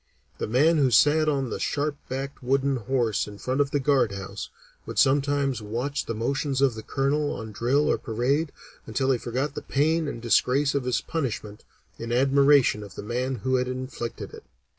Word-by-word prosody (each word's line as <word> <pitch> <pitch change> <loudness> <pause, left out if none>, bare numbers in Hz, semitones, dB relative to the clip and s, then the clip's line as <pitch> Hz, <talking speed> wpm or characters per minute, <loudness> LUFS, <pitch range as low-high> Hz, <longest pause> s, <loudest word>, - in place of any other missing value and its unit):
The - - -2
man 150 +8 +3
who 135 -3 +4
sat 150 +6 +4
on 135 -5 -1
a - - -4
sharp 145 0 -1
backed 135 +2 -5
wooden 135 +1 +1
horse 120 -2 0
in 105 -1 -9
front 130 +6 -1
of 140 - +1
the 145 - 0
guard 130 -6 +2
house, 100 0 -6 0.4
would - - -6
sometimes 140 -2 +2
watch 120 +7 -3
the 115 - -3
motions 135 +4 -1
of 135 -3 +3
the 110 - -7
Colonel 145 +4 0
on 110 -1 -7
drill 125 +8 +1
or - - +1
parade, 135 +7 0 0.4
until 130 +4 0
he 125 - +1
forgot 130 +5 -2
the - - -5
pain 160 +3 +1
and 130 - -5
disgrace 125 +5 +2
of 140 -3 -1
his 125 -2 0
punishment 110 -9 -4 0.3
in 115 0 -5
admiration 135 -2 +4
of 100 -2 -10
the - - -7
man 125 +4 -2
who 130 0 +2
inflicted 130 -2 -4
it." - - -11
130 Hz, 185 wpm, -26 LUFS, 120-140 Hz, 0.4 s, who